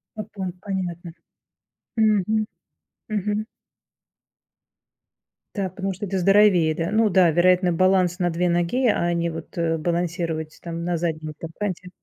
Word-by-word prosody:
По 215 Hz, -, -4 dB
по 200 Hz, -2 st, -7 dB, 0.2 s
понятно. 180 Hz, -3 st, -4 dB, 0.9 s
Мгм, 215 Hz, -1 st, +2 dB, 0.6 s
мгм. 210 Hz, 0 st, -1 dB, 2.1 s
Да, 195 Hz, -3 st, -1 dB
потому 190 Hz, +1 st, -4 dB
что 195 Hz, +3 st, -5 dB
это 190 Hz, +1 st, -2 dB
здоровее, 190 Hz, -3 st, +4 dB
да. 165 Hz, +1 st, -2 dB
Ну 220 Hz, 0 st, +3 dB
да, 180 Hz, -2 st, +5 dB
вероятно, 180 Hz, +2 st, +3 dB
баланс 185 Hz, 0 st, +2 dB
на 175 Hz, -2 st, 0 dB
2 175 Hz, +2 st, 0 dB
ноги, 175 Hz, +10 st, +1 dB
а 175 Hz, -5 st, +1 dB
не, 170 Hz, 0 st, 0 dB
вот, 165 Hz, -1 st, -8 dB
э, 165 Hz, -1 st, 0 dB
балансировать 170 Hz, -1 st, -2 dB
там, 170 Hz, -1 st, -5 dB
на 175 Hz, 0 st, -1 dB
заднем 160 Hz, -2 st, -3 dB
там 165 Hz, -, -7 dB
канте. 185 Hz, -3 st, -3 dB
180 Hz, 140 wpm, -23 LUFS, 170-195 Hz, 2.1 s, да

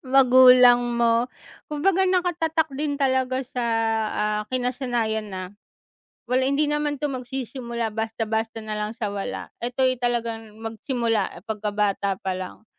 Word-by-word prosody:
magulang 250 Hz, -1 st, +8 dB, 0.2 s
mo. 235 Hz, 0 st, +2 dB, 0.4 s
Kumbaga, 375 Hz, +5 st, +2 dB
nakatatak 335 Hz, -3 st, +1 dB
din 285 Hz, +1 st, -2 dB
talaga 260 Hz, -1 st, +1 dB
sa, 250 Hz, -1 st, -4 dB, 0.5 s
ah 210 Hz, 0 st, 0 dB
kinasanayan 245 Hz, -4 st, -1 dB
na 185 Hz, -1 st, -5 dB, 0.9 s
wala 255 Hz, +1 st, +2 dB
hindi 285 Hz, +2 st, +2 dB
naman 295 Hz, -1 st, -1 dB
to 295 Hz, -, +1 dB
magsisimula 245 Hz, -2 st, -4 dB
basta-basta 225 Hz, 0 st, -2 dB
na 215 Hz, 0 st, -4 dB
lang 210 Hz, 0 st, -2 dB
sa 220 Hz, -, -3 dB
wala. 200 Hz, -1 st, -4 dB, 0.2 s
Ito'y 255 Hz, +1 st, +1 dB
talagang 230 Hz, -3 st, -2 dB
magsimula 225 Hz, -3 st, -2 dB
pagkabata 205 Hz, -2 st, -1 dB
pa 190 Hz, -1 st, -1 dB
lang. 185 Hz, +3 st, -8 dB
245 Hz, 120 wpm, -24 LUFS, 220-265 Hz, 0.9 s, magulang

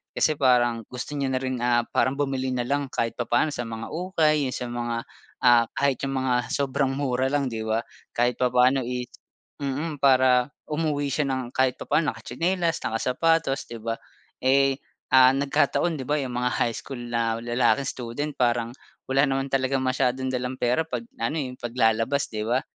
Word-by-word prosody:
Kasi 155 Hz, -, +2 dB
parang 120 Hz, -4 st, +3 dB
gusto 125 Hz, +3 st, -6 dB
niya 140 Hz, -1 st, 0 dB
na 130 Hz, -, 0 dB
rin 130 Hz, -1 st, -2 dB
ah, 120 Hz, -1 st, +3 dB
parang 130 Hz, +3 st, +1 dB
bumili 135 Hz, -2 st, -1 dB
na 120 Hz, -, 0 dB
lang 140 Hz, 0 st, 0 dB
kahit 115 Hz, -1 st, -1 dB
papaano 120 Hz, +6 st, +1 dB
sa 120 Hz, -, -3 dB
mga 115 Hz, 0 st, -6 dB
ukay 160 Hz, -4 st, +1 dB
yung 130 Hz, -, -4 dB
sa 125 Hz, -, -4 dB
mga, 120 Hz, -1 st, -2 dB, 0.5 s
ah, 120 Hz, -1 st, +6 dB
kahit 140 Hz, -2 st, +1 dB
yun 135 Hz, -, -3 dB
mga 130 Hz, -1 st, +1 dB, 0.2 s
sobrang 135 Hz, -1 st, 0 dB
mura 130 Hz, -2 st, 0 dB
lang, 145 Hz, -2 st, +1 dB
'di 110 Hz, -1 st, -4 dB
ba, 110 Hz, +1 st, +1 dB, 0.3 s
kahit 120 Hz, 0 st, +1 dB
papaano 125 Hz, +2 st, +4 dB
is 125 Hz, 0 st, -4 dB, 0.5 s
mm, 145 Hz, +3 st, -3 dB
para 130 Hz, -2 st, +5 dB, 0.2 s
umuwi 150 Hz, -2 st, -1 dB
siya 150 Hz, -2 st, 0 dB
ng 130 Hz, -2 st, -3 dB
kahit 130 Hz, -1 st, +2 dB
papaano 155 Hz, -1 st, +1 dB
nakatsinelas 170 Hz, -1 st, -1 dB
nakasapatos, 135 Hz, +6 st, +1 dB
'di 115 Hz, -1 st, -7 dB
ba. 115 Hz, 0 st, -2 dB, 0.5 s
Eh, 135 Hz, +1 st, +4 dB, 0.4 s
ah, 130 Hz, 0 st, +8 dB
nagkataon 150 Hz, +4 st, +1 dB
di 130 Hz, -, -5 dB
ba, 150 Hz, +1 st, +1 dB
yung 125 Hz, -2 st, -4 dB
mga 125 Hz, 0 st, 0 dB
high 115 Hz, -2 st, +1 dB
school 135 Hz, -3 st, -7 dB
na 115 Hz, -1 st, 0 dB
lalaking 120 Hz, +2 st, +1 dB
student 130 Hz, +5 st, -4 dB
parang 120 Hz, -2 st, +1 dB, 0.4 s
wala 135 Hz, +2 st, +4 dB
naman 135 Hz, 0 st, -1 dB
talagang 135 Hz, 0 st, +1 dB
masyadong 130 Hz, 0 st, 0 dB
dalang 125 Hz, 0 st, -2 dB
pera 125 Hz, +6 st, +2 dB
'pag 120 Hz, -6 st, -4 dB
na 115 Hz, -, -1 dB
ano, -, -, -2 dB
eh, 130 Hz, -2 st, -5 dB
paglalabas, 120 Hz, +3 st, +1 dB
'di 110 Hz, -1 st, -4 dB
ba? 125 Hz, +3 st, +2 dB
130 Hz, 180 wpm, -25 LUFS, 120-140 Hz, 0.5 s, ah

